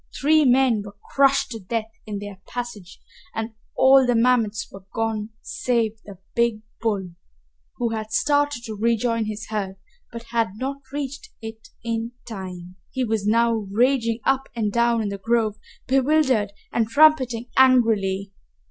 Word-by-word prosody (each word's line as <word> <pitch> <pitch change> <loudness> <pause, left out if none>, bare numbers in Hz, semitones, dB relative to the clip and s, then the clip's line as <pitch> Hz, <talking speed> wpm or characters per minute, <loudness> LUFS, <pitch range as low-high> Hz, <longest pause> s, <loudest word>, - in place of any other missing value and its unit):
Three 310 +1 +4
men 250 -3 +4
were 200 0 -11 0.2
crushed 275 -2 +3
to 225 - -5
death 220 +3 -3 0.2
in 210 -1 -4
their 200 -1 -8
passage 235 -7 -7 0.4
and 225 +1 -3 0.3
all 265 +1 +7
the 245 - +3
mammoths 230 -3 +2
were 195 -1 -12
gone 225 -1 -2
save 225 -3 -1
the 200 -2 -10 0.2
big 235 -2 +1 0.2
bull, 200 -5 -1 0.7
who 235 - 0
had 220 -1 -4
started 290 -4 +1
to 220 - -5
rejoin 230 +1 +1
his 215 +1 -6
herd 200 -3 -3 0.4
but 235 0 -7
had 230 -5 +1
not 270 +3 -3
reached 285 +8 -5
it 225 0 -9 0.2
in 230 0 -3
time. 185 -4 -8
He 260 - -2
was 220 -3 -1
now 230 +2 +3
raging 230 +3 +1
up 270 0 +1
and 215 -3 0
down 235 -1 +2
in 205 - -2
the 200 0 -5
grove, 220 0 +1 0.3
bewildered 265 -5 +2 0.2
and 225 -1 +1
trumpeting 255 -4 +4
angrily. 220 -7 +3
230 Hz, 150 wpm, -23 LUFS, 210-250 Hz, 0.7 s, all